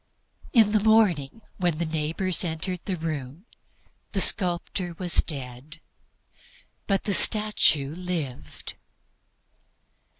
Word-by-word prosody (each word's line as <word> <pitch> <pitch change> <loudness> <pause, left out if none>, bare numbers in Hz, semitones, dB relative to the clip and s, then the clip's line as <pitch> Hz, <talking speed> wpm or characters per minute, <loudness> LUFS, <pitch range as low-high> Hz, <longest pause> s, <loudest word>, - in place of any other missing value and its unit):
In 220 -5 +4
the 210 -1 +1
morning 215 -6 +2
when 175 -2 0
the 170 - -2
neighbors 160 +4 0
entered 175 +2 -4
the 190 -3 -3
room 155 - -6 0.7
the - - -1
sculptor 175 -1 0
was 180 -2 +4
dead, 135 +1 -9 1.1
but 195 -2 0
the 205 - -1
statue 200 -11 +4
was 180 +1 -10
saved! 155 -8 -5
175 Hz, 105 wpm, -25 LUFS, 155-195 Hz, 1.1 s, In